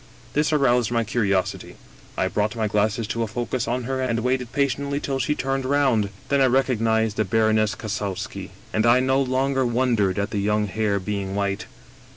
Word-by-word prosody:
This 150 +1 +1
aroused 125 -6 +3
my 115 -1 +1
curios 105 -5 0
ity. - - -11 0.4
I - - +1
brought 105 +1 -1
my 110 -2 0
glasses 105 +2 0
to 115 +1 -2
a 115 - 0
focus 120 +2 -3
on 125 +1 -1
her 130 +2 -2
and 115 -3 0
waited 125 0 -1
patiently 140 +1 0
till 135 -2 -2
she 150 +4 0
turned 135 -1 -1
round. 130 -6 +2 0.2
Then 140 -1 +3
I - - +6
recognized 115 -4 +1
the 110 - +3
Baroness 110 +1 +2
Kassowski, 100 -3 -4 0.2
and 110 +2 +2
I 120 +2 +6
no 130 +1 +2
longer 135 +1 +1
wondered 120 -6 +1
at 100 +1 -1
the 105 - -1
young 105 +1 +1
hair 100 0 0
being 100 0 -3
white. 100 -1 -2
115 Hz, 190 wpm, -23 LUFS, 105-130 Hz, 0.4 s, I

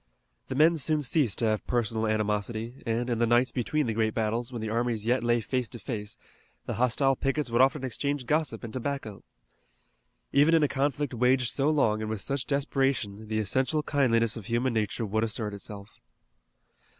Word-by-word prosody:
The 130 - -4
men 160 +4 +5
soon 155 0 +1
ceased 135 - +1
to 120 - 0
have 110 -1 0
personal 110 -2 0
animosity, 110 +3 -2
and, 115 +2 0
in 120 -2 -1
the 120 - +3
nights 120 +1 +3
between 145 +5 -1
the 115 - -1
great 110 0 0
battles, 115 +2 -1
when 120 - -5
the 110 0 -3
armies 115 -2 -1
yet 120 +1 +1
lay 120 0 +2
face 125 +1 -2
to - - -8
face, 105 -4 -5 0.5
the - - -3
hostile 125 +4 +2
pickets 135 -1 -1
would 120 - +4
often 135 +1 +3
exchange 140 +2 -1
gossip 150 -5 0
and 115 -2 -7
tobacco. 130 -5 -4 1.1
Even 150 +4 +5
in 160 - +4
a - - +4
conflict 140 0 -1
waged 125 +1 +2
so 140 +2 +2
long 110 -8 +2
and 110 - -3
with 110 -2 -3
such 135 0 -2
desperation 135 -7 -1
the 110 0 -2
essential 130 +8 0
kindliness 115 -7 +2
of 110 -4 -8
human 120 +2 0
nature 110 +1 -1
would 110 +2 0
assert 110 -2 -2
itself. 100 0 -9
120 Hz, 185 wpm, -28 LUFS, 110-135 Hz, 1.1 s, men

